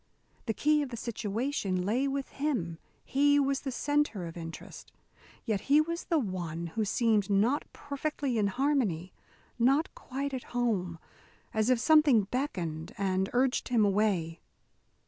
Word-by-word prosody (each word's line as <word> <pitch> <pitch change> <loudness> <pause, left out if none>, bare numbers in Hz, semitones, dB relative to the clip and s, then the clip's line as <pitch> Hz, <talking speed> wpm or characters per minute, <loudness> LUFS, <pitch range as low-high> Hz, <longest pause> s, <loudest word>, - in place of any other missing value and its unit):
The 225 - 0
key 300 +4 +3
of 285 - -3
the 235 - -6
situation 215 -4 -2
lay 245 +7 +1
with 275 0 -3
him. 235 - -2 0.3
He 285 +1 +3
was 275 -1 +1
the 270 - -4
centre 290 -7 0
of 165 - -8
interest. 165 -1 -9 0.5
Yet 215 -5 0
he 290 +2 +7
was 335 +2 -1
the 330 - +1
one 175 - -3
who 220 -2 0
seemed 215 -1 +2
not 220 +8 +1
perfectly 285 -3 -3
in 205 - +2
harmony, 205 - 0 0.5
not 270 +7 +3
quite 275 +2 -5
at 255 - -4
home, 190 -8 0 0.6
as 220 +2 +1
if 255 -2 +4
something 295 -5 +5
beckoned 180 - -3
and 190 -1 0
urged 255 +1 +1
him 235 -4 +3
away. 195 -5 +1
235 Hz, 145 wpm, -30 LUFS, 195-280 Hz, 0.6 s, he